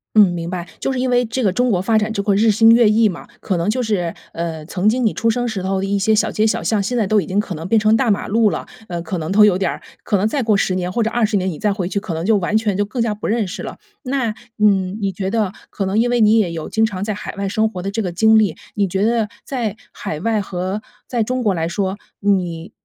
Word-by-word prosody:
嗯， 210 -2 +8
明 170 0 -4
白。 180 -1 -4
就 - - -1
是 260 - -2
因 255 - 0
为 245 0 +3
这 235 +3 -2
个 195 -4 +2
中 250 +4 +1
国 190 -6 +2
发 220 +3 +2
展 215 +1 0
就 200 -2 -2
会 200 -1 +2
日 220 +2 +4
新 225 +2 +6
月 230 -2 +6
异 220 +1 +4
嘛， 180 -5 -6
可 185 - -1
能 170 +4 0
就 250 +4 0
是， 185 -7 -1 0.2
呃， 165 -2 -4
曾 185 +5 +1
经 245 +2 +1
你 220 - +2
出 230 - 0
生 245 +1 0
时 210 -5 -3
候 190 +1 -1
的 195 - -1
一 200 0 0
些 220 +2 +3
小 210 - +1
街 215 +1 +2
小 - - -1
巷 215 -2 +1
现 245 +5 -2
在 220 - +2
都 210 +1 +3
已 - - -7
经 195 +2 0
可 205 -2 -2
能 165 +1 -6
变 225 +3 +3
成 215 +1 +4
大 245 0 +1
马 200 - 0
路 220 0 +3
了。 - - -4 0.2
呃， 175 -1 -4
可 175 +1 -3
能 160 +2 -4
都 210 +2 +7
有 205 -3 +4
点 190 -2 0
儿 - - -5 0.2
可 205 - +1
能 200 +3 +1
再 275 +5 -1
过 215 -4 +2
10 190 - +1
年 180 -1 -2
或 230 +5 0
者 225 - -1
20 220 -3 +1
年， 185 0 -1
你 155 - -8
再 210 - +1
回 185 -3 -3
去 200 - -1
可 195 -5 -5
能 165 +2 -3
就 220 0 +4
完 195 +3 +1
全 215 -3 0
就 205 - +1
更 225 +4 -6
加 225 -2 0
不 210 - -5
认 220 -2 0
识 185 - -6
了。 - - -7 0.3
那， 255 -4 -1 0.2
嗯， 200 -2 +2
你 195 -1 -1
觉 190 +1 -3
得 210 -3 0 0.2
可 195 - -3
能 200 +4 +1
因 240 - +2
为 240 -1 +2
你 215 +1 +5
也 185 -6 +1
有 160 -2 -5
经 220 - +1
常 190 -3 -5
在 215 +1 -1
海 205 - -7
外 200 0 -2
生 220 +2 +1
活 180 -5 -7
的 195 - -3
这 225 +2 -2
个 180 -4 -2
经 220 +5 +5
历， 200 -7 +1 0.2
你 200 -2 +1
觉 190 +3 0
得 225 -2 +1 0.2
在 230 -6 -3 0.2
海 150 - -5
外 220 +3 0
和 190 +1 -3 0.3
在 240 -2 -1
中 250 +3 -1
国 205 -3 +2
来 165 -2 -1
说， 190 +3 -2 0.2
你， 180 -5 0
205 Hz, 315 characters per minute, -19 LUFS, 185-225 Hz, 0.3 s, 嗯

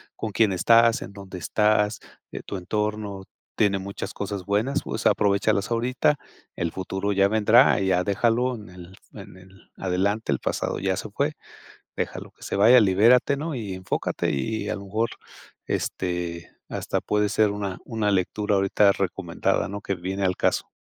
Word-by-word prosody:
con 110 - -4
quién 100 0 +2
estás, 115 +5 +4
en - - -7
dónde 100 -1 -9
estás, 105 +4 +1 0.3
eh, - - -6
tu - - -5
entorno 105 +1 -3 0.3
tiene 100 -2 +2
muchas 100 +1 -6
cosas 100 -2 -4
buenas, 105 +7 0
pues - - -5
aprovéchalas 100 +1 +2
ahorita, 125 +5 +1 0.4
el 85 -1 -2
futuro 95 +2 -3
ya 100 0 +4
vendrá, 110 +4 +5
ya 95 -2 +2
déjalo 120 +5 +1
en 105 -4 -11
el 90 +1 -12 0.2
en - - -11
el 95 +1 -19
adelante, 95 +1 -1
el 70 - 0
pasado - - -2
ya - - 0
se - - -5
fue, - - -1 0.6
déjalo - - -4
que - - -18
se - - -3
vaya, 120 +5 +7
libérate, 110 +8 +4
¿no?, 155 +1 -4
y 105 -6 -4
enfócate 95 0 -2
y 75 +10 -2
a 110 - -1
lo 100 - -8
mejor 110 +4 -1 0.6
este 85 -2 -3 0.2
hasta - - -2
puede 105 0 0
ser 105 +1 +3
una 100 -2 -4
una 110 -2 -1
lectura 100 +2 0
ahorita 100 +1 +4
recomendada, 95 -3 -1
¿no?, 100 +2 -6
que 100 - -2
viene 95 +2 -4
al 90 -1 +1
caso. - - 0
100 Hz, 165 wpm, -24 LUFS, 95-110 Hz, 0.6 s, vaya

